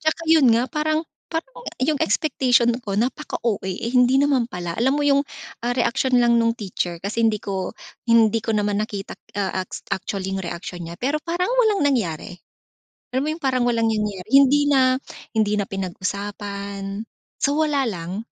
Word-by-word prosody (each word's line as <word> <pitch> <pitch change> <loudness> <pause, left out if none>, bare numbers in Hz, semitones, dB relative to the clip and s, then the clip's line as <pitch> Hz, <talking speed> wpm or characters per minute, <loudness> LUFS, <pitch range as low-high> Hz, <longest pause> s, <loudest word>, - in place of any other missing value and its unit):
At 315 0 +2
saka - - -11
yun 315 -5 +6
nga 240 +1 0
parang 310 +1 0 0.2
parang 410 +10 -5 0.2
yung 295 +1 +2
expectation 245 -1 +2
ko 205 -5 -5
napaka-OA, 235 -3 -1
eh, 190 +5 -3
hindi 250 +2 +4
naman 270 -5 +2
pala. 175 -6 -5
Alam 265 +5 +2
mo - - +1
yung, 280 0 +3 0.4
ah, 245 - +1
reaksyon 250 0 +2
lang 235 0 +4
nung 230 0 +3
teacher 180 -5 -4
kasi 220 +3 0
hindi 215 -2 +1
ko 195 +2 -3 0.3
hindi 230 -1 +5
ko 225 0 -2
naman 205 -1 +1
nakita 205 -2 -4
k - - -66 0.2
ah, 185 -1 -2
aks - - -8
actually 190 0 -3
yung 195 -1 -3
reaksyon 175 0 -6
niya 170 - -7
pero 285 +5 0
parang 350 +5 -1
walang 430 -8 +3
nangyari. 225 - 0 0.8
Alam 260 +1 0
mo - - -1
yung 330 - -13
parang 255 -2 +1
walang 230 -2 +2
nangyari? 210 -3 -2
Hindi 275 +1 +6
na 260 -1 +4 0.4
hindi 215 -1 +2
na 200 - -1
pinag-usapan, 200 +1 -4 0.4
so 285 +2 +2
wala 300 -3 +2
lang. 185 +2 -4
230 Hz, 175 wpm, -22 LUFS, 200-275 Hz, 0.8 s, yun